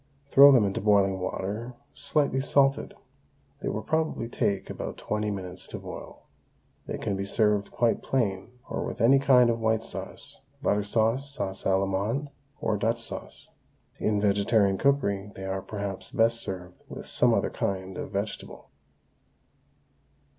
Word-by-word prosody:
Throw 140 Hz, +1 st, +9 dB
them 125 Hz, -6 st, +5 dB
into 95 Hz, -, -2 dB
boiling 100 Hz, -2 st, +3 dB
water 105 Hz, +6 st, -4 dB, 0.2 s
slightly 140 Hz, -3 st, 0 dB
salted. 135 Hz, 0 st, +2 dB, 0.7 s
They -, -, -2 dB
will 110 Hz, -, -3 dB
probably 160 Hz, -5 st, -1 dB
take 100 Hz, -4 st, -1 dB
about -, -, -6 dB
twenty 105 Hz, 0 st, -2 dB
minutes 95 Hz, -2 st, -6 dB
to -, -, -6 dB
boil. -, -, -9 dB, 0.6 s
They -, -, -3 dB
can 100 Hz, -, -2 dB
be 95 Hz, -, -2 dB
served 105 Hz, 0 st, +1 dB
quite 115 Hz, -1 st, +1 dB
plain 105 Hz, -7 st, -1 dB, 0.2 s
or -, -, -3 dB
with -, -, -5 dB
any 130 Hz, +4 st, +6 dB
kind 125 Hz, -3 st, +5 dB
of 115 Hz, -, -2 dB
white 110 Hz, 0 st, +1 dB
sauce, -, -, -7 dB, 0.2 s
butter 105 Hz, 0 st, +1 dB
sauce, 115 Hz, +6 st, +1 dB
sauce 100 Hz, -9 st, -5 dB
Allemande, 100 Hz, +8 st, 0 dB, 0.3 s
or 110 Hz, -, 0 dB
Dutch 115 Hz, +3 st, 0 dB
sauce. 115 Hz, -, -8 dB, 0.5 s
In 105 Hz, -1 st, +1 dB
vegetarian 100 Hz, -1 st, +2 dB
cookery 105 Hz, -8 st, +1 dB
they 95 Hz, -, -7 dB
are 95 Hz, 0 st, -2 dB
perhaps 100 Hz, -1 st, -5 dB
best 115 Hz, 0 st, +2 dB
served 90 Hz, -1 st, -7 dB
with -, -, -8 dB
some -, -, +2 dB
other -, -, +1 dB
kind 95 Hz, -1 st, -3 dB
of -, -, -5 dB
vegetable. 100 Hz, +2 st, -5 dB
105 Hz, 145 wpm, -27 LUFS, 100-120 Hz, 0.7 s, Throw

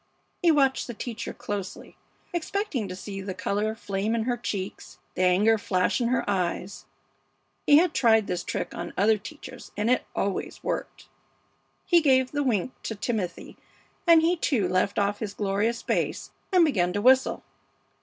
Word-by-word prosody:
He 350 Hz, -, +4 dB
watched 275 Hz, -4 st, +3 dB
the 240 Hz, -, -6 dB
teacher 230 Hz, 0 st, -5 dB
closely, 200 Hz, -3 st, -6 dB, 0.4 s
expecting 345 Hz, -, -2 dB
to 185 Hz, -, -6 dB
see 195 Hz, +1 st, -7 dB
the 190 Hz, -1 st, -5 dB
color 210 Hz, +3 st, -1 dB
flame 210 Hz, 0 st, -2 dB
in 225 Hz, -, 0 dB
her 245 Hz, +1 st, 0 dB
cheeks, 190 Hz, -, -5 dB, 0.2 s
the -, -, -3 dB
anger 200 Hz, +5 st, +4 dB
flash 185 Hz, +4 st, 0 dB
in 235 Hz, -, +1 dB
her 255 Hz, +2 st, 0 dB
eyes; 185 Hz, -4 st, -2 dB, 0.8 s
he 290 Hz, -, +8 dB
had 340 Hz, 0 st, +3 dB
tried 225 Hz, -3 st, +4 dB
this 180 Hz, -2 st, -3 dB
trick -, -, -4 dB
on -, -, -6 dB
other 215 Hz, +2 st, +3 dB
teachers 255 Hz, +3 st, -10 dB
and 210 Hz, +3 st, +1 dB
it 250 Hz, -, +1 dB
always 200 Hz, -1 st, -3 dB
worked. -, -, -4 dB, 0.8 s
He 345 Hz, -2 st, +5 dB
gave 260 Hz, -3 st, +3 dB
the 290 Hz, -, -1 dB
wink 245 Hz, -4 st, 0 dB
to 225 Hz, -, -4 dB
Timothy, 205 Hz, -4 st, -4 dB, 0.5 s
and 330 Hz, -1 st, +7 dB
he 340 Hz, +2 st, +3 dB
too 255 Hz, -, +1 dB
left 185 Hz, +2 st, 0 dB
off 205 Hz, 0 st, +1 dB
his 205 Hz, -2 st, -5 dB
glorious 205 Hz, +3 st, -1 dB
bass -, -, -2 dB, 0.2 s
and 360 Hz, -3 st, +6 dB
began 180 Hz, -, +1 dB
to 205 Hz, -, -1 dB
whistle. 260 Hz, +1 st, +4 dB
220 Hz, 165 wpm, -26 LUFS, 195-260 Hz, 0.8 s, he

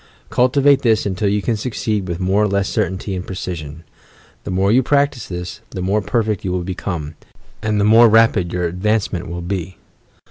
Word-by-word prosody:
Cultivate 135 Hz, +2 st, +4 dB
this 115 Hz, -3 st, +2 dB
until 100 Hz, +1 st, 0 dB
you 100 Hz, 0 st, 0 dB
can 115 Hz, -, 0 dB
succeed 105 Hz, -3 st, -2 dB
with 85 Hz, -1 st, -4 dB
more 95 Hz, +2 st, +1 dB
or 105 Hz, -, +3 dB
less 100 Hz, -1 st, 0 dB
certainty 95 Hz, +2 st, -2 dB
and 90 Hz, -, -4 dB
precision. 85 Hz, -5 st, -6 dB, 0.6 s
The -, -, -5 dB
more 95 Hz, +2 st, +1 dB
you 125 Hz, +3 st, +5 dB
practise 140 Hz, -2 st, +1 dB
this, 90 Hz, -1 st, -6 dB
the 95 Hz, -, -6 dB
more 100 Hz, +3 st, +1 dB
perfect 110 Hz, -2 st, -1 dB
you 95 Hz, -, -2 dB
will 90 Hz, -1 st, -1 dB
become, 85 Hz, -4 st, -4 dB, 0.5 s
and 105 Hz, -1 st, 0 dB
the 100 Hz, -, +2 dB
more 115 Hz, +2 st, +7 dB
rapid 110 Hz, -5 st, +3 dB
your 90 Hz, -1 st, -1 dB
advancement 95 Hz, +1 st, -1 dB
will 85 Hz, +1 st, -5 dB
be. 90 Hz, -1 st, -4 dB
100 Hz, 185 wpm, -19 LUFS, 90-110 Hz, 0.6 s, more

